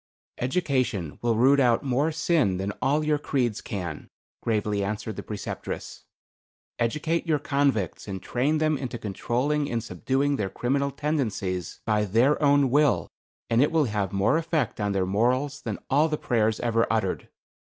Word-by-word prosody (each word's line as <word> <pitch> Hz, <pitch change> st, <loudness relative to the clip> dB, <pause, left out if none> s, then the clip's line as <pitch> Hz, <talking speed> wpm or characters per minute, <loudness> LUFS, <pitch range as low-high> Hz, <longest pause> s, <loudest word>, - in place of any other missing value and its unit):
"Education 130 Hz, -, -1 dB
will 120 Hz, -1 st, +1 dB
root 135 Hz, +5 st, +5 dB
out 120 Hz, -2 st, +3 dB
more 140 Hz, +4 st, +1 dB
sin 155 Hz, -, +1 dB
than 95 Hz, +2 st, -2 dB
all 150 Hz, +3 st, +2 dB
your 150 Hz, -1 st, +1 dB
creeds 125 Hz, -7 st, -1 dB
can," 90 Hz, -8 st, -5 dB, 0.3 s
gravely 105 Hz, -2 st, 0 dB
answered 105 Hz, +1 st, -3 dB
the -, -, -5 dB
Preceptress. 105 Hz, -1 st, -6 dB, 0.7 s
"Educate 155 Hz, +9 st, 0 dB
your 155 Hz, -2 st, +3 dB
convicts 140 Hz, -, 0 dB
and 95 Hz, -1 st, -4 dB
train 135 Hz, -, 0 dB
them 155 Hz, -2 st, +1 dB
into 125 Hz, -3 st, -4 dB
controlling 125 Hz, +8 st, -1 dB
and 115 Hz, -2 st, -2 dB
subduing 135 Hz, +10 st, 0 dB
their 100 Hz, -2 st, -1 dB
criminal 140 Hz, +7 st, 0 dB
tendencies 115 Hz, -, -2 dB
by 105 Hz, -1 st, +2 dB
their 115 Hz, +10 st, +3 dB
own 140 Hz, -3 st, +4 dB
will, 145 Hz, -1 st, +3 dB, 0.4 s
and 115 Hz, +1 st, +3 dB
it 145 Hz, -, +3 dB
will 160 Hz, -3 st, +3 dB
have 105 Hz, -5 st, -1 dB
more 100 Hz, +9 st, +2 dB
effect 155 Hz, -9 st, -1 dB
on 105 Hz, -1 st, 0 dB
their 95 Hz, -1 st, +1 dB
morals 125 Hz, +9 st, 0 dB
than -, -, -4 dB
all 150 Hz, +4 st, +3 dB
the 150 Hz, -, -1 dB
prayers 110 Hz, -4 st, +1 dB
ever 115 Hz, -1 st, +2 dB
uttered. 110 Hz, -5 st, -1 dB
125 Hz, 160 wpm, -26 LUFS, 105-145 Hz, 0.7 s, root